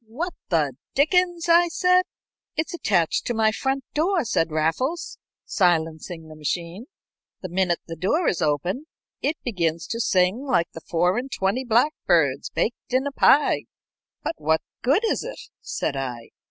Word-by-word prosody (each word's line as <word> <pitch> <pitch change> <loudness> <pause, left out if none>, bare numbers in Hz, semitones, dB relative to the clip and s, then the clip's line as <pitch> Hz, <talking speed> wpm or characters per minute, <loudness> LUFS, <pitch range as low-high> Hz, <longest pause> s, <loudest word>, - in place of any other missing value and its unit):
"What 320 +11 -4 0.2
the 155 -6 +1 0.2
dickens!" 345 +4 +2
I 340 +1 +6
said. 365 +2 +3 0.5
"It's 320 +5 -1
attached 180 - +1
to 240 - -1
my 220 -1 +3
front 270 +4 -1
door," 335 0 +1
said 165 -7 +1
Raffles, 165 - -1 0.3
silencing 165 -2 0
the 155 - -11
machine. 170 - -4 0.6
"The 185 - -4
minute 180 -1 +1
the 165 - -6
door 205 - +1
is 175 - 0
opened 175 - -1 0.3
it 305 +2 0
begins 170 -8 -1
to 230 - -2
sing 185 -1 +2
like 255 -12 +1
the 165 - -9
four 180 +6 +1
and 265 +2 -7
twenty 195 +6 0
blackbirds 195 - +2
baked 235 +2 -3
in 260 +2 +2
a 285 - -2
pie." 285 +1 +4 0.6
"But - - -1
what 160 +1 +1 0.2
good 300 - +2
is 445 - 0
it?" - - -7 0.2
said 140 - -3
I. 125 -4 -5
215 Hz, 155 wpm, -24 LUFS, -, 0.6 s, I